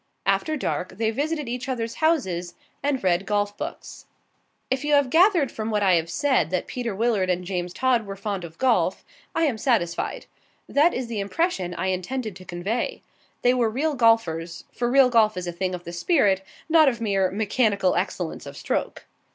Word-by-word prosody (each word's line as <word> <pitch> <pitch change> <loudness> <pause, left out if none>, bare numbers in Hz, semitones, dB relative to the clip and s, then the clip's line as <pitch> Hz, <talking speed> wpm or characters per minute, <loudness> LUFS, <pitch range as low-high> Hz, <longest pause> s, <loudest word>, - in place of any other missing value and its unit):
After 310 -1 +1
dark, 185 -8 -3
they 220 0 +1
visited 295 +3 -2
each 250 +3 -4
other's 230 -2 -3
houses 185 - 0 0.3
and 280 -3 -1
read 185 +1 +1
golf 205 0 0
books. - - -8 0.6
If 260 +1 0
you 295 0 +1
have 280 -3 +2
gathered 340 - +4
from 220 0 -4
what 210 -2 +1
I 190 -2 +4
have 165 -1 +1
said 260 - +1
that 185 0 -1
Peter 240 -5 -4
Willard 210 -3 +1
and 180 0 0
James 180 -1 -3
Todd 245 -1 +1
were 195 - -5
fond 195 -2 -4
of 165 -1 -10
golf, 260 -2 +1 0.3
I 330 - +2
am 265 -8 +1
satisfied. 210 -11 0 0.4
That 310 +5 +3
is 255 - -2
the 230 -3 -4
impression 200 - -1
I 190 - -1
intended 215 +4 -3
to 185 - -13
convey. 190 +8 -3 0.4
They 245 - +5
were 240 -3 +2
real 290 +7 0
golfers, 225 - +1
for 240 0 -1
real 265 0 +6
golf 215 -4 +4
is 180 - -3
a 175 - -3
thing 185 +1 -2
of 175 - -9
the 170 - -8
spirit, 195 - +2 0.3
not 320 -3 +6
of 235 -3 -4
mere 195 -4 +1
mechanical 205 -2 +1
excellence 180 -4 -3
of 140 - -9
stroke. - - -3
220 Hz, 190 wpm, -24 LUFS, 185-260 Hz, 0.6 s, real